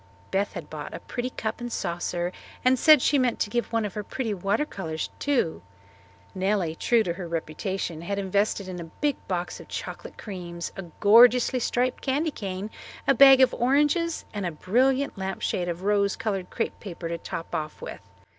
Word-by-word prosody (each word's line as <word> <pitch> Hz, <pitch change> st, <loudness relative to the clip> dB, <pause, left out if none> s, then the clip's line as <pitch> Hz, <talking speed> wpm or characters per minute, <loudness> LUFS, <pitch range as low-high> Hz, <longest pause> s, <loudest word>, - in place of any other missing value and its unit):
Beth 200 Hz, +1 st, 0 dB
had -, -, -6 dB
bought -, -, -7 dB
a -, -, -6 dB
pretty 245 Hz, +1 st, -4 dB
cup 220 Hz, -2 st, -4 dB
and 240 Hz, 0 st, -4 dB
saucer 175 Hz, -1 st, -2 dB, 0.3 s
and 255 Hz, 0 st, +4 dB
said 305 Hz, -2 st, +7 dB
she 285 Hz, -, +4 dB
meant 250 Hz, -2 st, +1 dB
to 205 Hz, -, -1 dB
give 240 Hz, 0 st, -1 dB
one 230 Hz, -2 st, +1 dB
of 200 Hz, -, -4 dB
her 210 Hz, -, -4 dB
pretty 225 Hz, 0 st, -3 dB
water 200 Hz, +9 st, 0 dB
colours 160 Hz, -, -4 dB
too. 265 Hz, -, 0 dB, 0.7 s
Nellie, 190 Hz, -3 st, 0 dB
true 230 Hz, +7 st, +2 dB
to 170 Hz, -, -1 dB
her 175 Hz, 0 st, -6 dB
reputation, 165 Hz, +1 st, -3 dB
had 200 Hz, +4 st, -3 dB
invested 200 Hz, 0 st, 0 dB
in 180 Hz, -1 st, -6 dB
a 170 Hz, -, -6 dB
big 285 Hz, -, -1 dB
box 180 Hz, -2 st, -3 dB
of -, -, -12 dB
chocolate -, -, -7 dB
creams, 175 Hz, -4 st, -6 dB
a 195 Hz, -, -6 dB, 0.2 s
gorgeously 245 Hz, +4 st, +6 dB
striped 245 Hz, +1 st, 0 dB
candy 290 Hz, +4 st, 0 dB
cane, 195 Hz, -2 st, -5 dB, 0.4 s
a -, -, +6 dB
bag 270 Hz, 0 st, +8 dB
of 255 Hz, -1 st, +5 dB
oranges, 295 Hz, +6 st, +2 dB
and 205 Hz, -2 st, -3 dB
a 175 Hz, -, -1 dB
brilliant 255 Hz, -, +1 dB
lampshade 190 Hz, -2 st, -2 dB
of 170 Hz, +2 st, -4 dB
rose 200 Hz, -1 st, +2 dB
coloured 200 Hz, -5 st, -3 dB
crepe 230 Hz, -, -3 dB
paper 175 Hz, -4 st, -6 dB
to 170 Hz, 0 st, -3 dB
top 165 Hz, -, -6 dB
off 155 Hz, 0 st, -3 dB
with. -, -, -7 dB
205 Hz, 185 wpm, -26 LUFS, 180-250 Hz, 0.7 s, bag